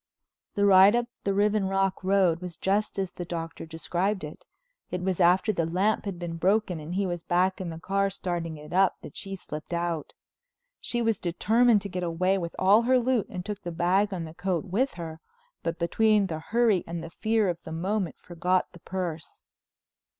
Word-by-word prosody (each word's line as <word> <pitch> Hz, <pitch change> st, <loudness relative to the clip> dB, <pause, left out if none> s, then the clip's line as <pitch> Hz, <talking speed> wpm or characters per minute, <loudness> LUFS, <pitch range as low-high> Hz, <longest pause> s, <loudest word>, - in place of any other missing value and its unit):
The 205 Hz, -1 st, +3 dB
ride 195 Hz, +2 st, +7 dB
up 240 Hz, 0 st, +1 dB, 0.2 s
the 200 Hz, -, +2 dB
Riven 205 Hz, -1 st, +2 dB
Rock 195 Hz, 0 st, 0 dB
Road 185 Hz, -3 st, +3 dB
was 180 Hz, -2 st, -7 dB
just 200 Hz, +3 st, 0 dB
as 190 Hz, -2 st, -1 dB
the 175 Hz, -, -6 dB
Doctor 165 Hz, -1 st, -6 dB
described 175 Hz, +5 st, -2 dB
it. 150 Hz, 0 st, -9 dB, 0.4 s
It 180 Hz, 0 st, -3 dB
was 185 Hz, -1 st, -1 dB
after 185 Hz, +4 st, +4 dB
the 165 Hz, -4 st, 0 dB
lamp 190 Hz, +7 st, +1 dB
had 195 Hz, -3 st, -4 dB
been 170 Hz, -1 st, -5 dB
broken 190 Hz, 0 st, +1 dB
and 155 Hz, +4 st, -6 dB
he 200 Hz, +1 st, +1 dB
was 175 Hz, -2 st, -3 dB
back 185 Hz, +3 st, +1 dB
in 180 Hz, -, -4 dB
the 165 Hz, -, -6 dB
car 195 Hz, +3 st, 0 dB
starting 175 Hz, -4 st, -4 dB
it 150 Hz, +2 st, -10 dB
up, 190 Hz, 0 st, +4 dB
that 145 Hz, -, -10 dB
she 195 Hz, 0 st, -3 dB
slipped 155 Hz, -3 st, -7 dB
out. 170 Hz, -3 st, -2 dB, 0.7 s
She 240 Hz, -1 st, -2 dB
was 225 Hz, -3 st, +1 dB
determined 215 Hz, +5 st, +3 dB
to -, -, -3 dB
get 180 Hz, -1 st, -4 dB
away 180 Hz, +3 st, +1 dB
with 170 Hz, -2 st, -5 dB
all 200 Hz, +4 st, +5 dB
her 255 Hz, +2 st, +3 dB
loot 250 Hz, -3 st, +1 dB
and 180 Hz, -1 st, -6 dB
took 210 Hz, -2 st, -5 dB
the 175 Hz, -, -5 dB
bag 185 Hz, +5 st, +2 dB
and 165 Hz, -4 st, -5 dB
coat 185 Hz, -1 st, -1 dB
with 225 Hz, +9 st, 0 dB
her, 160 Hz, -2 st, -7 dB, 0.4 s
but 165 Hz, 0 st, -2 dB
between 210 Hz, +5 st, +3 dB
the 160 Hz, -4 st, -4 dB
hurry 220 Hz, +1 st, +2 dB
and 170 Hz, 0 st, -5 dB
fear 220 Hz, -1 st, +1 dB
of 175 Hz, -1 st, -2 dB
the 160 Hz, -, -9 dB
moment 185 Hz, +2 st, -1 dB
forgot 180 Hz, +1 st, -1 dB
the 175 Hz, -, -14 dB
purse. 170 Hz, -4 st, -5 dB
185 Hz, 195 wpm, -27 LUFS, 170-200 Hz, 0.7 s, ride